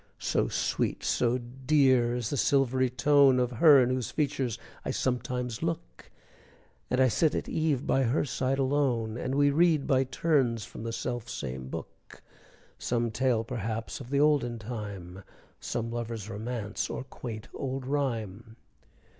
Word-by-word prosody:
So - - 0
sweet, - - -1
so 120 0 +1
dear 130 -1 +2
is 120 -3 -3
the - - 0
silvery 130 -2 +2
tone, 135 +1 +4
Of 125 0 +1
her 140 +4 +7
in 125 - 0
whose 130 -3 -1
features 140 -6 -1 0.3
I - - -4
sometimes 125 -2 -2
look, 165 0 -4 0.8
As 125 - +1
I 130 - +6
sit 150 +7 +2
at - - -2
eve 155 -4 0
by 135 - +2
her 125 +6 +1
side 135 0 -1
alone, 130 -5 +1
And 130 +2 -3
we 145 0 +4
read 160 -1 +3
by 135 -2 +2
turns, 130 -6 +1
from - - -10
the 115 0 -4
self 120 0 -4
same 65 0 -5
book, - - -9 0.6
Some 120 -1 -1
tale 120 -1 +1
perhaps 115 -1 -4
of 120 - -10
the 140 0 +1
olden 145 -5 +2
time, 100 -5 -7 0.4
Some 115 -1 -3
lover's 115 -3 -4
romance 110 0 -4
or - - -4
quaint 115 -4 -8
old 135 -1 -4
rhyme. 115 -6 -3
125 Hz, 155 wpm, -29 LUFS, 115-135 Hz, 0.8 s, her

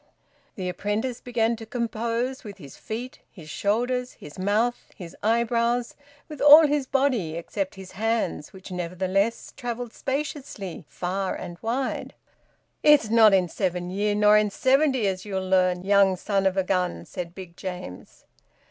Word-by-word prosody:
The 185 -2 -4
apprentice 210 +6 -2
began 235 -1 0
to 225 - -9
compose 235 +2 -2
with 205 -3 -9
his 140 -8 -12
feet, 240 +4 -6
his 155 -5 -11
shoulders, 245 +4 -1
his 150 +4 -12
mouth, 215 +5 0
his 175 -3 -10
eyebrows 235 +2 +1 0.3
with 305 -2 -9
all 295 +2 +10
his 290 -2 0
body 255 - +1
except 275 - -4
his 190 -1 -10
hands, 220 -6 -2
which 190 0 -12
nevertheless 185 +5 -1
travelled 245 -2 -5
spaciously 270 - -4
far 185 +2 -2
and 175 0 -8
wide. 250 +4 -2 0.7
"It's 295 -8 +5
not 225 -2 +7
in 185 -2 +3
seven 180 0 -2
year, 205 +2 0
nor 210 0 +6
in 210 0 +1
seventy, 260 +2 +2
as 190 -1 -1
you'll 190 -2 -3
learn, 185 -1 +2
young 200 -1 +4
son 195 0 0
of 190 0 -1
a 190 - +3
gun!" 180 - -1
said 175 - -7
Big 180 -3 -10
James. 135 - -8
210 Hz, 150 wpm, -25 LUFS, 185-240 Hz, 0.7 s, all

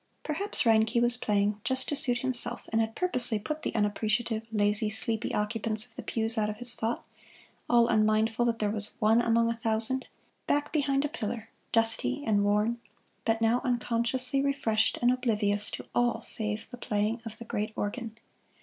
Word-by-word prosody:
Perhaps 380 +7 0
Reinke 225 0 +2
was 240 0 +5
playing 210 -3 -1
just 260 0 +1
to 295 - -2
suit 265 -4 +9
himself, 240 -2 -1
and 225 0 0
had 220 0 -4
purposely 250 -11 0
put 305 +9 -6
the - - -4
unappreciative, 215 +2 -1
lazy, 210 0 0
sleepy 220 +1 -1
occupants 215 +1 -2
of 245 - -17
the - - -8
pews 225 0 +2
out 210 -1 -1
of 210 - -6
his 245 +1 +1
thought, 225 +1 -3 0.6
all 235 -1 +4
unmindful 220 +1 +1
that 230 -1 -1
there 210 -2 -1
was 210 -1 -4
one 220 +2 +3
among 230 0 +1
a 230 - 0
thousand, 225 +3 0 0.4
back 290 0 -1
behind 280 -2 0
a - - 0
pillar, 225 -4 -6 0.2
dusty 225 +5 0
and 205 -2 +1
worn, 210 +3 0 0.5
but 225 0 0
now 230 +2 +1
unconsciously 250 +2 +1
refreshed 225 -6 0
and 245 - +4
oblivious 210 -5 0
to - - -7
all 240 -1 0
save 220 -1 +3
the 245 - -9
playing 215 0 -2
of 225 -1 -9
the 235 - -10
great 215 -1 -4
organ. 220 +1 -5
225 Hz, 175 wpm, -27 LUFS, 215-245 Hz, 0.6 s, suit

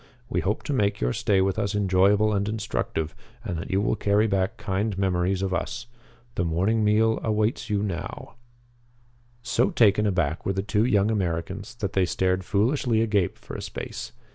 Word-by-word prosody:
We - - 0
hope 105 +3 -1
to 145 - -2
make 100 -5 +1
your - - 0
stay 100 -2 +2
with 95 +2 0
us 100 -1 -1
enjoyable 100 +2 +3
and 100 +1 0
instructive, 90 -7 -2 0.3
and 90 - -3
that - - -6
you 95 - +1
will 105 - +1
carry 105 0 +2
back 100 +1 0
kind 100 0 -2
memories 95 0 0
of 95 -1 -1
us. 120 +7 -3 0.5
The 85 - -1
morning 95 +7 +1
meal 110 +2 +3
awaits 110 +2 0
you 105 -1 0
now." 100 +3 -5 1.1
So 120 - +2
taken 105 -2 +4
aback 90 -5 0
were 95 - 0
the 95 0 -2
two 105 +1 +1
young 105 -3 +3
Americans 95 +3 -3
that 105 -5 -4
they 95 -1 +3
stared 95 +1 0
foolishly 115 +4 +1
agape 105 -5 +1
for - - -11
a - - -5
space. - - -6
100 Hz, 180 wpm, -25 LUFS, 95-110 Hz, 1.1 s, taken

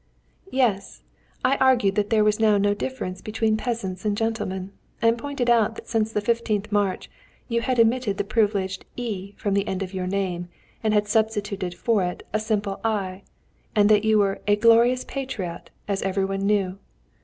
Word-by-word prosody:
"Yes. 230 - 0 0.4
I 270 +2 +3
argued 250 -7 +4
that 210 0 0
there 220 -2 +4
was 210 0 +2
now 215 -2 +4
no 205 0 +2
difference 205 -5 -4
between 220 0 0
peasants 215 -5 -3
and 210 -1 0
gentlemen, 195 -4 -2 0.3
and 230 0 +3
pointed 265 0 -3
out 230 -2 +3
that - - -10
since 220 -1 0
the 210 -1 -1
15th 215 -2 0
March 205 -2 0 0.4
you 235 -1 0
had 250 +1 0
omitted 230 -3 +2
the - - 0
privileged 200 -3 0
'y' 205 -5 -5
from 200 - -1
the 200 +1 +1
end 190 0 -2
of 185 0 -7
your 185 -1 -3
name, 185 -2 -2 0.4
and 220 - +2
had 210 0 +2
substituted 205 -4 -1
for 225 +1 +1
it 180 0 -4
a 215 - +2
simple 210 -2 -2
'i,' 200 -4 -1 0.5
and 205 0 +5
you 220 0 +4
were 200 -1 +1
a 205 - +5
'glorious 235 +3 +4
patriot,' 215 -11 -5 0.2
as 200 -1 -1
every 195 0 0
one 195 0 -2
knew. 195 -2 +1
210 Hz, 180 wpm, -24 LUFS, 195-230 Hz, 0.5 s, and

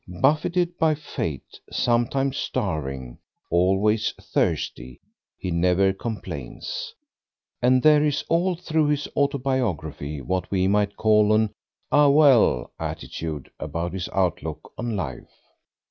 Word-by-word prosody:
Buffeted 155 - +1
by 160 -1 +3
Fate, 80 - -5
sometimes 125 +3 +1
starving, 70 - -3 0.3
always 95 +5 +2
thirsty, 60 0 -2 0.4
he 90 - -4
never 90 +3 +3
complains; 120 - -6 0.7
and 125 +1 +4
there 150 -1 +6
is 150 -2 0
all 175 +2 +2
through 160 -3 0
his 145 -1 0
autobiography 120 - -1
what 90 +8 -2
we 95 -1 +1
might 100 0 +1
call 105 -1 +4
an 110 -1 +2 0.4
"Ah, 145 -1 +6
well!" 140 - +5
attitude 75 -4 -5
about 85 +1 -3
his 95 -1 -4
outlook 95 -3 -2
on 115 -1 -3
life. 70 -11 -5
105 Hz, 115 wpm, -24 LUFS, 90-140 Hz, 0.7 s, there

